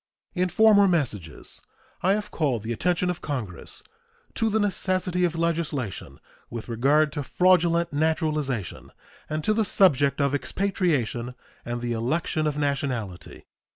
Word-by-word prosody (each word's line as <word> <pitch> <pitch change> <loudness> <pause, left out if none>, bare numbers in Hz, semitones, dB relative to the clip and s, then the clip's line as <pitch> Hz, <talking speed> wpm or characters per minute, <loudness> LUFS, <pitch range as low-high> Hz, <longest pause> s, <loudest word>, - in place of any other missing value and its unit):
In 180 0 0
former 205 +1 +6
messages 110 - -2 0.4
I 190 +2 +3
have 210 0 -3
called 130 -9 0
the 115 +1 -2
attention 180 +7 +1
of 175 - -7
Congress 115 - -5 0.5
to 225 - +1
the 220 +1 +1
necessity 185 -3 0
of 170 -1 -1
legislation 155 - -2 0.3
with 115 -2 -6
regard 140 +6 +2
to 145 - -3
fraudulent 170 +1 +2
naturalization 150 - -1 0.4
and 155 0 -2
to 215 - +3
the 220 +1 +2
subject 145 -9 +3
of 140 -1 +1
expatriation 145 - -1 0.3
and 120 0 -4
the 120 -1 -2
election 155 +6 -1
of 150 -1 -2
nationality. 135 - -3
155 Hz, 135 wpm, -25 LUFS, 125-180 Hz, 0.5 s, former